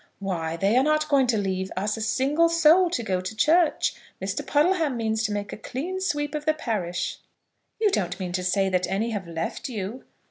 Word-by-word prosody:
"Why, 170 -4 -3
they 195 +6 +2
are 260 - +5
not 305 +1 +2
going 275 -3 +4
to 235 -3 +2
leave 190 -2 -2
us 205 +2 0
a 225 - -6
single 275 +9 +2
soul 335 +2 +5
to 245 -9 -2
go 185 -3 -1
to 185 +4 -6
church. 320 +8 +3 0.3
Mr. - - -3
Puddleham 305 -3 +2
means 220 -1 0
to 210 - -1
make 205 -1 -3
a - - -6
clean 330 - -4
sweep 295 -5 -1
of 300 -1 -4
the 310 0 +2
parish." 185 - -3 0.6
"You 430 -2 +3
don't 180 - -1
mean 180 -2 -3
to 180 0 -2
say 195 +2 +2
that 185 -1 0
any 215 +4 -1
have 200 -5 -4
left 165 - -4
you?" 220 +2 -5
220 Hz, 210 wpm, -25 LUFS, 190-300 Hz, 0.6 s, are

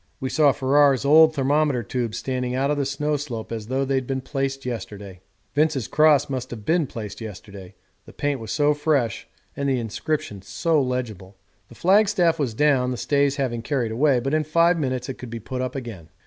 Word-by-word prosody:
We 130 -2 -3
saw 150 -1 +4
Ferrar's 140 0 +3
old 155 +2 +6
thermometer 140 -2 +1
tubes 115 0 -3
standing 125 -1 -2
out 135 +2 +1
of 150 - 0
the 140 -2 0
snow 150 +2 -1
slope 120 -7 -6
as 110 -2 -5
though 135 +2 0
they'd 130 -2 -1
been 135 -1 -1
placed 135 0 -3
yesterday. 100 -6 -6 0.3
Vince's 145 -5 +1
cross 155 -2 +4
might 130 -2 -4
have 110 -4 -8
been 165 -2 +2
placed 110 -2 -7
yesterday 100 -3 -10 0.3
the - - -11
paint 145 -2 -2
was 110 -2 -7
so 150 0 +3
fresh 145 -7 0 0.3
and 140 0 -1
the 130 - +1
inscription 115 -2 -3
so 140 - 0
legible. 110 -7 -4 0.3
The 120 - -14
flagstaff 190 - +3
was 125 -7 -1
down, 135 -2 +2
the 125 - -3
stays 140 +1 +1
having 125 -5 -2
carried 120 -2 -1
away, 130 +2 +3
but 135 +4 -3
in 155 0 +2
five 170 +3 +3
minutes 130 -3 -2
it 135 - -6
could 125 - -8
be 115 0 -6
put 125 +3 -5
up 130 +1 -3
again. 110 -11 -7
135 Hz, 200 wpm, -23 LUFS, 120-145 Hz, 0.3 s, old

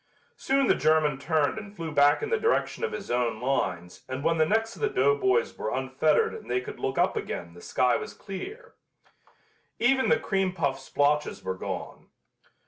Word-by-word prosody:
Soon 275 0 +1
the - - +4
German 155 -3 +2
turned 155 +5 +1
and 205 -1 -11
flew 165 -3 -5
back 145 - +4
in 445 - -3
the 460 - +2
direction 460 +1 0
of 465 - 0
his 200 -9 -6
own 120 -2 0
lines 95 -9 -2
and 130 +2 -4
when 165 +1 +2
the 155 - +4
necks 225 +3 0
of - - -13
the 430 - +2
doughboys 415 +2 +2
were - - -3
unfettered 455 -1 +1
and 450 - -10
they 380 - +1
could 420 +2 -8
look 410 -1 -2
up - - +2
again 85 - -5
the 85 - -13
sky 125 -1 +2
was - - -7
clear. 410 - -8 1.0
Even 260 +2 +3
the - - +5
cream 195 -4 0
puff 140 -6 -1
splotches 145 +2 0
were 95 0 -2
gone. 95 - -6
185 Hz, 190 wpm, -27 LUFS, -, 1.0 s, the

